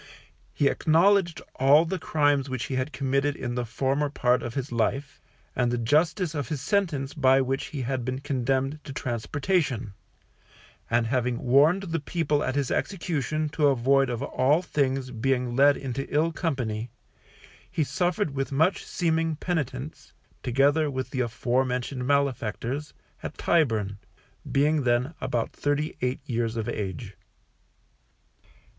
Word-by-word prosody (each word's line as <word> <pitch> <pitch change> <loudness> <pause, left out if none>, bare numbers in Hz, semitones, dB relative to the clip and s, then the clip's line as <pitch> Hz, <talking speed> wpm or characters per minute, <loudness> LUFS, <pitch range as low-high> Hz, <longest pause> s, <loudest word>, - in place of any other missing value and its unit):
He 145 - +2
acknowledged 175 +4 +3
all 140 +5 +6
the 185 +2 -3
crimes 145 -3 +1
which 130 -1 -3
he - - -4
had 130 +3 -1
committed 140 +1 0
in 120 -2 -4
the 120 -1 -2
former 140 +5 0
part 125 -3 +2
of 120 - -6
his 135 -1 -3
life, 130 +4 -1 0.3
and 125 -1 +2
the 120 - 0
justice 160 - +1
of 145 -2 -3
his 150 -3 -2
sentence 150 -5 0
by 135 -2 +4
which 135 0 -1
he 145 -4 -5
had 130 0 -2
been 130 +1 -2
condemned 135 +1 -1
to 140 - -8
transportation; 130 - -1 1.0
and 115 0 +2
having 125 0 0
warned 145 +11 +4
the 165 -3 -2
people 150 -1 0
at 130 - -2
his 140 -3 0
execution 155 -5 -1
to 150 0 +2
avoid 135 0 +3
of 120 +1 -3
all 145 +5 +2
things 135 -5 -1
being 125 0 0
led 140 +2 +5
into 135 0 -5
ill 160 +3 +2
company, 125 - -2 0.8
he 165 -3 0
suffered 175 0 0
with 135 0 -2
much 160 +7 +2
seeming 165 -2 0
penitence, 150 -4 -4 0.3
together 140 +5 +2
with 130 -2 -4
the 130 - -3
afore 125 +1 +1
mentioned 125 0 -3
malefactors, 140 0 -1 0.3
at - - -7
Tyburn, 110 - +1 0.5
being 150 +2 +3
then 125 +4 +1
about 125 -3 -1
thirty 145 +2 -1
eight 125 +3 -1
years 115 -3 -1
of 110 - -2
age. 105 +1 -4
135 Hz, 145 wpm, -26 LUFS, 125-150 Hz, 1.0 s, all